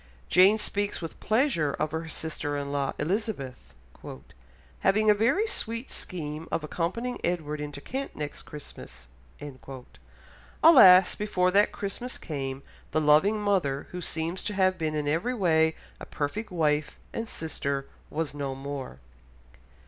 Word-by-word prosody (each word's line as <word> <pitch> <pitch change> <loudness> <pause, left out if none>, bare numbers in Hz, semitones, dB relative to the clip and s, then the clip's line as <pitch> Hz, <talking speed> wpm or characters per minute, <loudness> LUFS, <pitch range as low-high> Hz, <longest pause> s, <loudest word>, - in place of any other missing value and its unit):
Jane 190 +4 +6
speaks 205 -1 -1
with 165 -2 -7
pleasure 215 - +1
of 155 -1 -2
her 160 +1 -4
sister 150 -2 -4
in 140 0 -4
law, 140 -1 -1
Elizabeth, 145 - -3 1.0
"having 215 +2 +4
a - - +7
very 235 - +2
sweet 230 - -3
scheme 155 -2 -5
of 160 - -1
accompanying 185 +11 -2
Edward 150 -4 -2
into 145 -1 -6
Kent 270 - -5
next 150 -1 -5
Christmas." 150 - -11 1.6
Alas, 190 - +9
before 185 -3 +1
that 205 +2 +4
Christmas 225 +5 -5
came, 135 -3 -5 0.3
the 155 - +1
loving 155 +8 +4
mother, 185 -10 0
who 180 - -5
seems 165 +2 -2
to 210 - -3
have 185 -1 +3
been 155 -2 -2
in 150 -1 -1
every 170 +12 0
way 160 -6 +3 0.2
a - - -9
perfect 205 +10 -3
wife 155 -4 0 0.2
and 230 0 -4
sister, 140 -3 -3 0.2
was 160 -1 -3
no 140 -2 -3
more. 135 - -6
165 Hz, 140 wpm, -27 LUFS, 150-205 Hz, 1.6 s, Alas